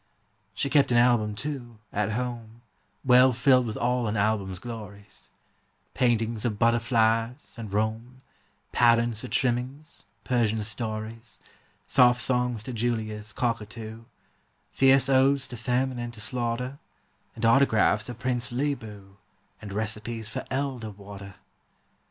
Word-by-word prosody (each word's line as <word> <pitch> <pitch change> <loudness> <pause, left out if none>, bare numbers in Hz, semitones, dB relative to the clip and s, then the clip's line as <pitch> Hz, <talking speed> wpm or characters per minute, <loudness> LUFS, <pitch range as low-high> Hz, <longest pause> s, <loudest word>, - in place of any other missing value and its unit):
She - - -1
kept 145 -3 +4
an 120 - +4
album 120 -3 +3
too, 125 -3 -5 0.2
at 105 +1 0
home, 120 -1 -5 0.4
Well 125 0 +6
filled 125 0 +3
with 110 - -4
all 125 -1 0
an 105 +1 -1
album's 100 -3 0
glories, 105 -2 -10 0.6
Paintings 115 -3 +1
of 110 -4 -1
butterflies 115 +1 +1
and 115 -5 -7
Rome, 110 +4 -2 0.5
Patterns 115 -2 +3
for 125 - -6
trimmings, 130 +5 -2 0.2
Persian 110 -2 +1
stories, 110 +2 -5 0.5
Soft 125 -1 +5
songs 125 -3 0
to 125 - -6
Julia's 110 -2 -2
cockatoo, 115 -1 -4 0.7
Fierce 135 0 +4
odes 135 +1 +3
to 125 - -6
famine 125 +1 -1
and 120 0 -4
to - - -11
slaughter, 125 +4 -2 0.6
And - - -2
autographs 115 -3 +3
of 120 - -6
Prince 120 -1 -1
Leeboo, 110 -8 -4 0.4
And 105 -2 -8
recipes 110 +2 -4
for - - -4
elder 130 -5 -2
water. 100 -1 -11
115 Hz, 125 wpm, -27 LUFS, 110-125 Hz, 0.7 s, Well